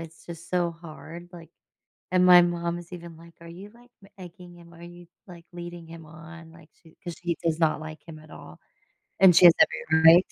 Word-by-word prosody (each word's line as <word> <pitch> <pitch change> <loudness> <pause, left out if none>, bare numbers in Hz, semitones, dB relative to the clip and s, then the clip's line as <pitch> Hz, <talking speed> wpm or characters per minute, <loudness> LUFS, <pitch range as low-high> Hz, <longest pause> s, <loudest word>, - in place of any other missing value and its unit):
it's 165 0 -13
just 170 -1 -12
so 175 -1 -1
hard, 170 +1 -13
like 165 -2 -14 0.6
and 180 0 +2
my 180 -1 +7
mom 170 0 -3
is 175 +1 -14
even 170 -2 -11
like, 170 0 -18
"Are 170 - -13
you, 190 +5 -12
like, 240 +1 -22
m - - -18
egging 180 -1 -13
him 170 0 -18
are 170 - -16
you, 175 0 -14 0.2
like, 175 -3 -14
leading 175 -1 -10
him 165 -1 -13
on? 165 +1 -14
Like 165 -1 -19 0.2
to" 160 - -19
'cause 175 -1 -7
she 170 -1 -3
does 165 -1 -2
not 155 -1 0
like 155 0 -10
him 160 -2 -12
at 155 0 -19
all. 80 +1 -14 0.6
And 185 -3 +6
she - - +6
has 170 - +9
every 160 0 +1
right 170 +3 +7
to. - - -25
170 Hz, 225 wpm, -24 LUFS, 165-175 Hz, 0.6 s, has